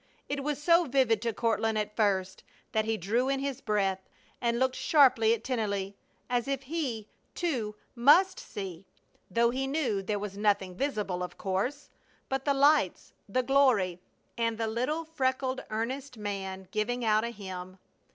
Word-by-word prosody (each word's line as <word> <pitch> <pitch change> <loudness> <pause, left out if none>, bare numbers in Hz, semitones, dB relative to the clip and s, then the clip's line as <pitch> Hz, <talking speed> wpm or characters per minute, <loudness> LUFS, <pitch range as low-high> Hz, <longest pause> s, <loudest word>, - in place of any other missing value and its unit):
It 280 -1 -3
was 295 0 -1
so 335 +3 +4
vivid 255 -6 +2
to 230 0 0
Courtland 225 -1 0
at 210 0 -2
first 190 -3 0 0.3
that 220 0 +1
he 225 0 0
drew 230 +8 0
in 275 0 +1
his 275 -1 -3
breath 195 -3 0 0.3
and 235 -1 +1
looked 260 +1 +1
sharply 260 -7 +5
at 225 - -11
Tennelly, 200 -6 -2 0.3
as 245 -1 0
if 275 -1 -2
he, 260 -8 -3 0.3
too, 245 -12 -2 0.2
must 295 +10 +5
see, 190 -2 -7 0.4
though 235 0 +3
he 265 +2 -2
knew 270 -9 0
there 205 +2 -2
was 200 -1 -6
nothing 200 -3 +1
visible, 205 -6 -2
of 180 - -5
course, 205 +10 -2 0.4
but 270 0 -2
the 285 - +3
lights, 280 - +3 0.2
the 255 +6 +1
glory, 245 -10 +3 0.4
and 230 -1 0
the 225 - -1
little, 255 +9 -1
freckled, 260 -4 -1
earnest 250 +4 -3
man 190 -2 -5
giving 240 +3 -1
out 215 0 +3
a 235 - -1
hymn. 185 -4 -8
230 Hz, 160 wpm, -29 LUFS, 205-270 Hz, 0.4 s, sharply